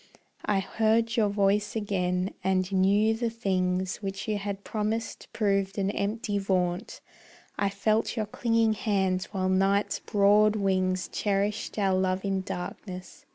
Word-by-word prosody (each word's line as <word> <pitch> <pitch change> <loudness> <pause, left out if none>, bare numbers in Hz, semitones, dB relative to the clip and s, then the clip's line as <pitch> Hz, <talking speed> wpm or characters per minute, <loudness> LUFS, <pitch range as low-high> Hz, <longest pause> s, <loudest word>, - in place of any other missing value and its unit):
I 200 -2 +2
heard 225 +3 +1
your 215 -3 +3
voice 205 +1 +1
again, 185 -3 -1
and 190 0 +1
knew 200 +3 +3
the 230 +1 -1
things 185 -4 -1
Which 195 0 -5
you 210 -1 0
had 200 0 -5
promised 220 +1 -3
proved 195 -2 0
an 195 0 +1
empty 205 0 -2
vaunt. 180 -2 -1 0.6
I 200 - +2
felt 215 +4 0
your 215 - 0
clinging 225 +1 +1
hands 190 -3 0
while 190 -2 -2
night's 195 +2 +2
broad 210 +1 +4
wings 185 -2 0
Cherished 205 +2 -1
our 195 -2 +2
love 185 +1 0
in 195 -1 0
darkness. 185 0 -7
200 Hz, 140 wpm, -27 LUFS, 190-215 Hz, 0.6 s, broad